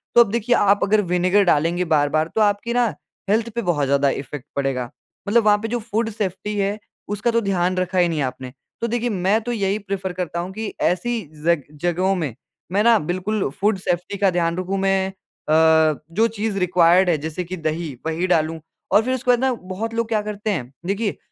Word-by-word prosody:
तो 240 Hz, -, +9 dB
अब 220 Hz, -4 st, +3 dB
देखिए 235 Hz, +2 st, +1 dB
आप 205 Hz, -2 st, +4 dB
अगर 210 Hz, +1 st, +3 dB
विनेगर 180 Hz, +3 st, +3 dB
डालेंगे 170 Hz, +1 st, +2 dB
बार-बार 155 Hz, +1 st, +2 dB
तो 220 Hz, -, +2 dB
आपकी 205 Hz, +3 st, +1 dB
ना 245 Hz, 0 st, +3 dB, 0.4 s
हेल्थ 220 Hz, +3 st, +2 dB
पे 235 Hz, -, 0 dB
बहुत 170 Hz, -8 st, 0 dB
ज़्यादा 140 Hz, +1 st, +2 dB
इफ़ेक्ट 135 Hz, 0 st, -5 dB
पड़ेगा। 135 Hz, -3 st, -1 dB, 0.4 s
मतलब 230 Hz, +3 st, +4 dB
वहाँ 210 Hz, -1 st, +5 dB
पे -, -, -1 dB
जो 240 Hz, +2 st, -2 dB
फूड 225 Hz, 0 st, -2 dB
सेफ्टी 205 Hz, -1 st, -3 dB
है, 200 Hz, +1 st, -1 dB, 0.3 s
उसका 210 Hz, +4 st, -1 dB
तो 230 Hz, 0 st, +2 dB
ध्यान 185 Hz, -3 st, 0 dB
रखा 185 Hz, 0 st, -1 dB
ही 175 Hz, -, +4 dB
नहीं 160 Hz, -3 st, -1 dB
आपने। 130 Hz, -1 st, -4 dB, 0.3 s
तो 235 Hz, -, 0 dB
देखिए 240 Hz, +1 st, -1 dB
मैं 195 Hz, +1 st, +1 dB
तो 240 Hz, +2 st, -4 dB
यही 200 Hz, -3 st, 0 dB
प्रेफर 195 Hz, -2 st, -4 dB
करता 175 Hz, -1 st, -3 dB
हूँ 175 Hz, +2 st, -4 dB
कि 220 Hz, +1 st, -5 dB
ऐसी 230 Hz, +7 st, 0 dB, 0.2 s
ज़ग 170 Hz, -4 st, +3 dB, 0.2 s
जगहों 180 Hz, +2 st, +1 dB
में 150 Hz, -, -3 dB, 0.4 s
मैं 200 Hz, +3 st, +2 dB
ना 230 Hz, 0 st, +6 dB
बिल्कुल 185 Hz, +5 st, -2 dB
फूड 210 Hz, 0 st, +2 dB
सेफ्टी 180 Hz, +2 st, -2 dB
का 200 Hz, -1 st, +3 dB
ध्यान 170 Hz, -1 st, 0 dB
रखूँ, 185 Hz, +2 st, -2 dB
मैं 195 Hz, 0 st, +1 dB, 0.4 s
अ, -, -, +4 dB, 0.6 s
जो 220 Hz, +7 st, +3 dB
चीज़ 210 Hz, -1 st, -2 dB
रिक्वायर्ड 180 Hz, 0 st, +4 dB
है 165 Hz, -, +3 dB
जैसे 160 Hz, +4 st, -4 dB
कि 180 Hz, +2 st, -6 dB
दही, 160 Hz, -1 st, -3 dB
वही 160 Hz, +3 st, -1 dB
डालूँ 160 Hz, -2 st, +1 dB, 0.3 s
और 210 Hz, -, +5 dB
फिर 255 Hz, +3 st, -1 dB
उसके 250 Hz, -1 st, +1 dB
बाद 245 Hz, -, +3 dB
ना 265 Hz, 0 st, +2 dB, 0.2 s
बहुत 225 Hz, +5 st, -3 dB
लोग 230 Hz, 0 st, -1 dB
क्या 220 Hz, -2 st, 0 dB
करते 210 Hz, 0 st, -3 dB
हैं? 130 Hz, -10 st, -3 dB
देखिए 200 Hz, +2 st, -1 dB
190 Hz, 210 wpm, -21 LUFS, 170-215 Hz, 0.6 s, तो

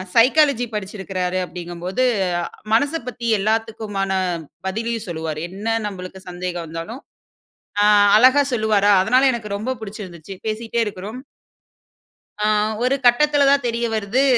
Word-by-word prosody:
Psychology 260 Hz, +1 st, +4 dB
படிச்சிருக்குறாரு 190 Hz, -2 st, -3 dB
அப்டிங்கும்போது, 180 Hz, +7 st, -3 dB, 0.7 s
மனச 285 Hz, +7 st, +3 dB
பத்தி 240 Hz, -1 st, -5 dB
எல்லாத்துக்குமான 215 Hz, -2 st, -1 dB, 0.6 s
பதிலயும் 225 Hz, +3 st, -3 dB
சொல்லுவாரு. 160 Hz, -2 st, -4 dB
என்ன 215 Hz, +4 st, -2 dB
நம்பளுக்கு 185 Hz, -1 st, -8 dB
சந்தேகம் 175 Hz, -1 st, -4 dB
வந்தாலும், 165 Hz, -, -7 dB, 0.8 s
ஆ -, -, +5 dB, 0.3 s
அழகா 260 Hz, +5 st, +6 dB
சொல்லுவாரா, 215 Hz, -3 st, +3 dB
அதனா 255 Hz, +6 st, +4 dB
எனக்கு 210 Hz, -4 st, -4 dB
ரொம்ப 255 Hz, +5 st, -3 dB
புடிச்சிருந்துச்சு, 195 Hz, -4 st, -8 dB
பேசிக்கிட்டே 225 Hz, +2 st, -2 dB
இருக்குறோம். 210 Hz, +4 st, -6 dB, 1.2 s
ஆ, 210 Hz, -, +2 dB, 0.4 s
ஒரு 260 Hz, +2 st, +2 dB
கட்டத்தில 285 Hz, +3 st, +4 dB
தான் 280 Hz, -3 st, +2 dB
தெரிய 235 Hz, 0 st, -1 dB
வருது. 220 Hz, +6 st, +1 dB
215 Hz, 115 wpm, -21 LUFS, 190-240 Hz, 1.2 s, அழகா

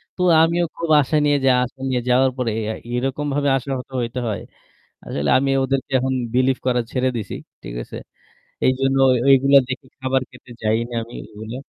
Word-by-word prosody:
তো 180 Hz, -, -5 dB, 0.2 s
আমিও 170 Hz, +1 st, +2 dB
খুব 170 Hz, -1 st, -4 dB
আশা 140 Hz, +3 st, -2 dB
নিয়ে 145 Hz, -1 st, +3 dB
যাওয়া 125 Hz, -1 st, +4 dB
আশা 130 Hz, +2 st, -13 dB
নিয়ে 125 Hz, -1 st, 0 dB
যাওয়ার 130 Hz, +1 st, +4 dB
পরে 125 Hz, -3 st, -1 dB, 0.4 s
এরকমভাবে 140 Hz, +3 st, -1 dB
আশাহত 130 Hz, 0 st, -5 dB
হইতে 120 Hz, +1 st, -3 dB
হয়। 110 Hz, -, -3 dB, 0.6 s
আসলে 75 Hz, 0 st, -2 dB
আমি 135 Hz, +1 st, 0 dB
ওদেরকে 135 Hz, +1 st, -2 dB
এখন 130 Hz, +1 st, -1 dB, 0.2 s
believe 130 Hz, +1 st, +2 dB
করা 125 Hz, -1 st, +2 dB
ছেড়ে 130 Hz, 0 st, +1 dB
দিছি। 110 Hz, -, -5 dB, 0.3 s
ঠিক -, -, -7 dB
আছে? -, -, -11 dB, 0.7 s
এইজন্য 135 Hz, +1 st, +2 dB
ওই 125 Hz, -, +3 dB
ওইগুলা 135 Hz, +1 st, +6 dB
দেখে 130 Hz, +1 st, -6 dB
খাবার 130 Hz, 0 st, 0 dB
খেতে -, -, -16 dB
যাই 110 Hz, 0 st, +2 dB
না -, -, -9 dB
আমি 120 Hz, -, -13 dB, 0.2 s
ওইগুলা। 110 Hz, +2 st, -7 dB
130 Hz, 175 wpm, -21 LUFS, 125-135 Hz, 0.7 s, ওইগুলা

